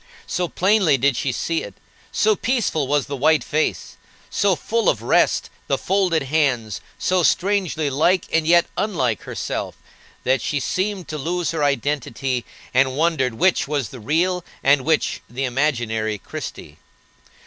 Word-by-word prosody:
So 180 -1 -1
plainly 185 -5 +3
did 135 0 +2
she 130 +2 -1
see 165 +6 -1
it, 100 - -9 0.4
so 215 0 +3
peaceful 200 - 0
was 145 -1 +1
the 140 - -4
white 155 +3 +3
face, 155 +1 -2 0.3
so 200 -2 +2
full 230 +4 0
of - - -1
rest - - +2 0.2
the - - +1
folded 185 -5 +1
hands, 130 -8 0 0.2
so 185 0 +1
strangely 185 -4 +1
like, 160 +7 +2
and 160 -1 +2
yet 170 0 +5
unlike, 130 - 0
herself, - - -4 0.5
that 130 -1 +2
she 145 - -1
seemed 190 +6 -2
to 155 - -4
lose 170 +1 -1
her 160 -3 -1
identity, 140 -3 -1 0.3
and 130 +1 +2
wondered 150 -7 +1
which 180 +4 +2
was 145 -5 -1
the 130 - -10
real 170 - 0 0.2
and 140 -1 +4
which 160 -1 +1
the 130 +3 -4
imaginary 120 -5 0
Christie. - - -8
150 Hz, 150 wpm, -21 LUFS, 130-180 Hz, 0.5 s, yet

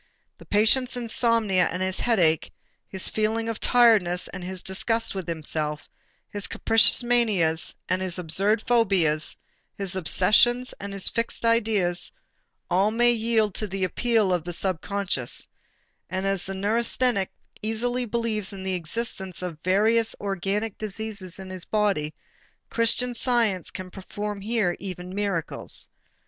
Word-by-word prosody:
The - - -14
patient's 245 +5 +3
insomnia 230 -6 +1
and 180 +2 -3
his 190 0 -1
headache, 175 -10 +2 0.4
his 190 -1 0
feeling 220 +1 -1
of 225 -2 -4
tiredness 215 -8 +3
and 190 -2 -8
his 185 0 -6
disgust 225 +4 -1
with 190 -3 -5
himself, 155 -2 -3 0.4
his 205 -1 -3
capricious 225 +2 +6
manias 210 -10 +2
and 185 0 0
his 185 -2 -2
absurd 195 +6 +2
phobias, 190 -10 +2 0.4
his 195 -1 -3
obsessions 215 +8 +3
and 200 0 -6
his 195 -1 0
fixed 230 0 -2
ideas 210 -6 +1 0.6
all 190 +4 +2
may 240 +2 +3
yield 225 -3 +1
to 215 - -3
the 195 0 -3
"appeal 220 +1 +1
to - - -17
the 175 +1 -5
subconscious," 185 -6 -2 0.6
and 190 +2 -3
as 195 -1 -1
a 195 - -4
neurasthenic 225 +1 +1 0.3
easily 240 +3 -2
believes 225 -3 -2
in 195 -1 -8
the 190 0 -2
existence 185 +1 -4
of 170 -4 -5
various 220 +5 +2
organic 200 +2 -2
diseases 210 -3 -2
in 190 -1 -8
his 185 -2 -4
body, 200 -8 0 0.6
Christian 245 +1 +2
Science 230 -7 0
can 185 -1 -8
perform 205 +2 -6
here 210 -4 0
even 185 -1 -7
"miracles." 195 -5 -4
200 Hz, 135 wpm, -25 LUFS, 185-225 Hz, 0.6 s, capricious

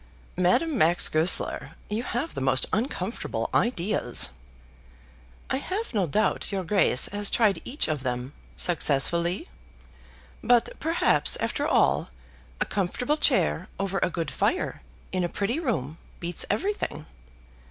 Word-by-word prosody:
"Madame 280 - +2
Max 170 +3 +5
Goesler, 160 +4 +1
you 210 +2 -2
have 250 +6 -3
the - - -4
most 130 0 +3
uncomfortable 235 +5 -2
ideas." 180 - +1 1.2
"I - - +2
have 380 - -4
no 195 -5 +1
doubt 210 +8 0
your 195 -2 -2
Grace 180 -8 +3
has 205 0 +1
tried 215 -4 +2
each 270 +5 0
of 150 -3 -2
them, 125 +1 -3 0.2
successfully. 170 +2 +1 1.0
But 240 0 +4
perhaps, 325 +3 +2
after - - -1
all, - - +2 0.5
a - - +1
comfortable 225 +10 -1
chair - - +2
over 195 0 -1
a - - +2
good 165 -2 -3
fire, - - -1 0.3
in 185 - 0
a 175 - -1
pretty 220 - -1
room, 165 - -2 0.2
beats 170 -1 -1
everything." 220 - -2
195 Hz, 130 wpm, -26 LUFS, 165-240 Hz, 1.2 s, Max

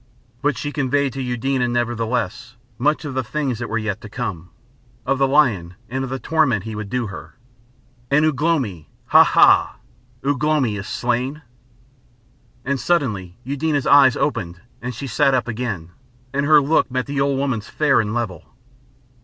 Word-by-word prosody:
But 145 -3 +1
she 145 - -4
conveyed 140 -2 0
to 135 - -4
Eudena, 125 +1 -1
nevertheless, 120 -2 -2 0.2
much 150 +4 +1
of 145 - -4
the 130 0 -1
things 130 -1 -2
that 120 - -4
were 115 - -1
yet 110 -1 -3
to 110 - -10
come, 100 -7 -5 0.6
of 135 - 0
the 135 - +4
Lion 115 - +2
and 130 +2 -2
of 135 - -4
the 130 - -3
torment 130 - +1
he 110 0 -6
would 105 -1 -6
do 125 +1 -1
her. 95 -3 -9 0.7
"And 150 +2 +4
Ugh 150 -3 0
lomi! 125 - 0 0.2
Ha, - - +8
ha! - - +4 0.5
Ugh 140 0 0
lomi 150 -8 +2
is 100 +1 -6
slain?" 125 +8 -2 1.2
And 140 0 -1
suddenly 110 - -1
Eudena's 145 +2 -1
eyes 140 -3 +6
opened 90 - -2 0.2
and 125 0 -5
she 140 - -6
sat 135 +2 +2
up 125 - 0
again, 110 -8 -4 0.4
and 140 +1 0
her 155 -1 +7
look 145 +1 +2
met 130 0 -2
the 140 -1 -2
old 140 -1 +1
woman's 130 -6 -2
fair 145 -5 +3
and 105 -1 -3
level. 105 -9 -5
130 Hz, 170 wpm, -21 LUFS, 110-140 Hz, 1.2 s, Ha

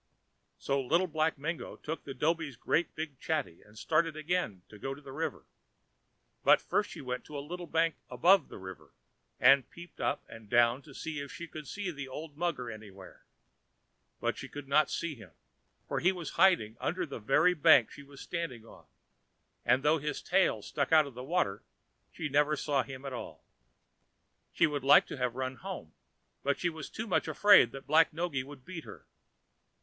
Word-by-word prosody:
So 140 0 0
Little 165 +8 +2
Black 155 -2 0
Mingo 160 +4 -4
took 160 +2 -6
the 135 - -6
dhobi's 155 -1 0
great 165 +7 0
big 155 -4 -5
chatty, 150 - -2
and 105 +1 -19
started 160 +4 +1
again 155 - -2
to 105 - -13
go 135 +5 -4
to - - -13
the 140 -2 -11
river. 160 +5 -4 1.0
But - - +6
first - - 0
she - - -8
went 125 -1 -4
to 150 - -7
a - - -2
little 175 +1 -6
bank 165 0 +1
above 170 +8 +4
the - - -10
river, 95 -6 -10 0.5
and 135 +1 +6
peeped 175 0 -12
up - - 0
and 115 -2 -12
down 120 +2 +4
to 140 -2 -15
see 155 -2 -4
if 140 -1 -6
she 170 - -7
could 155 -2 -9
see 200 -3 -4
the 140 -4 -7
old 150 +3 -8
mugger 155 -8 -2
anywhere. 100 -3 -12 0.9
But - - -1
she - - -6
could 145 -1 -8
not 150 +2 +4
see 170 -2 -2
him, 110 - -14 0.5
for - - -1
he 180 - +4
was 175 -5 -6
hiding 170 - +3
under 180 +1 -1
the 140 -6 -7
very 150 +11 +4
bank 160 -1 +6
she 145 - -11
was 140 -1 -14
standing 150 -10 -4
on, - - -16 0.8
and, 125 +3 +3
though 155 +2 +4
his 150 0 -4
tail - - +2
stuck - - -2
out 155 -2 +7
a - - -7
little, 130 - -1 0.5
she 160 - -4
never 150 +2 +2
saw 140 -2 +1
him 130 +1 -8
at 135 - -5
all. 120 - -8 1.1
She - - +3
would 145 -2 -1
have 135 - -7
liked 145 - +7
to 125 -2 -1
run 130 +2 -4
home, 185 - -7 0.5
but 140 0 0
she 175 - 0
was 160 -2 -8
too 220 - -5
much 205 - 0
afraid 160 - +6
that 135 - -8
Black 160 +2 +5
Noggy 160 -5 -2
would 135 -1 -12
beat 170 -4 -7
her. - - -12
145 Hz, 190 wpm, -31 LUFS, 130-165 Hz, 1.1 s, out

